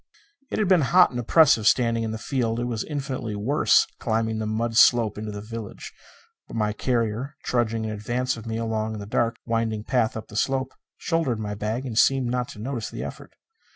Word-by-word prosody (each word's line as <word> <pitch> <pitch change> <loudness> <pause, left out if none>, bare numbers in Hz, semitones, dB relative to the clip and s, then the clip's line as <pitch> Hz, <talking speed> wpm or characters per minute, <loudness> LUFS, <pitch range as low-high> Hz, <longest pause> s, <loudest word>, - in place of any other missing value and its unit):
It - - -3
had 215 - +1
been 185 -3 +5
hot 180 +6 +5
and 120 - -4
oppressive 120 -3 +4
standing 115 -2 +3
in 110 - -2
the 110 - -3
field; 115 -1 -1
it - - -1
was 120 -3 -2
infinitely 135 -7 -4
worse 120 +9 +3
climbing 110 0 -1
the 110 - -2
mud 115 +1 -1
slope 115 -3 +5
into 105 +1 -5
the 105 0 -6
village; 110 0 -8 0.5
but - - -9
my 105 -1 0
carrier, 120 +4 -1
trudging 115 -2 0
in 110 - -3
advance 120 +5 -2
of 115 0 -9
me 110 0 -2
along 110 -1 -2
the 100 - -7
dark, 115 +2 0
winding 115 -2 -1
path 115 -2 0
up 110 - -7
the 105 - -11
slope, 130 +3 0 0.2
shouldered 165 -9 0
my 105 -1 -3
bag 110 +5 -3
and 115 -4 0
seemed 130 -3 +3
not 125 0 -1
to - - -11
notice 120 0 -4
the - - -6
effort. - - -9
115 Hz, 205 wpm, -25 LUFS, 110-125 Hz, 0.5 s, been